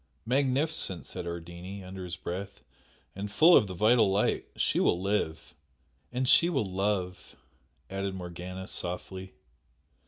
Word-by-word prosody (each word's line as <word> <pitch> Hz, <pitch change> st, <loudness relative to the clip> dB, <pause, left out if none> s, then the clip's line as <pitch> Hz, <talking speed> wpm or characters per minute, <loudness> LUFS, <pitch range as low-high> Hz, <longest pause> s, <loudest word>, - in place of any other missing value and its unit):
"Magnificent!" 135 Hz, -, +1 dB
said 85 Hz, -, -6 dB
Ardini, 85 Hz, +3 st, -7 dB
under 95 Hz, 0 st, -7 dB
his 90 Hz, -1 st, -5 dB
breath 95 Hz, +3 st, -6 dB, 0.5 s
"And 100 Hz, +1 st, -5 dB
full 165 Hz, +11 st, +7 dB
of 105 Hz, -, +5 dB
the 95 Hz, -, -6 dB
vital 110 Hz, +2 st, +4 dB
light, 100 Hz, +2 st, +1 dB
she -, -, +1 dB
will 85 Hz, -, +3 dB
live!" 95 Hz, -5 st, -2 dB, 0.6 s
"And 125 Hz, +1 st, -1 dB
she 170 Hz, +6 st, +6 dB
will 165 Hz, -, 0 dB
love!" 95 Hz, -1 st, -2 dB, 0.5 s
added 95 Hz, 0 st, -3 dB
Morgana, 90 Hz, +1 st, -7 dB
softly. 95 Hz, +1 st, -4 dB
95 Hz, 130 wpm, -29 LUFS, 90-105 Hz, 0.6 s, full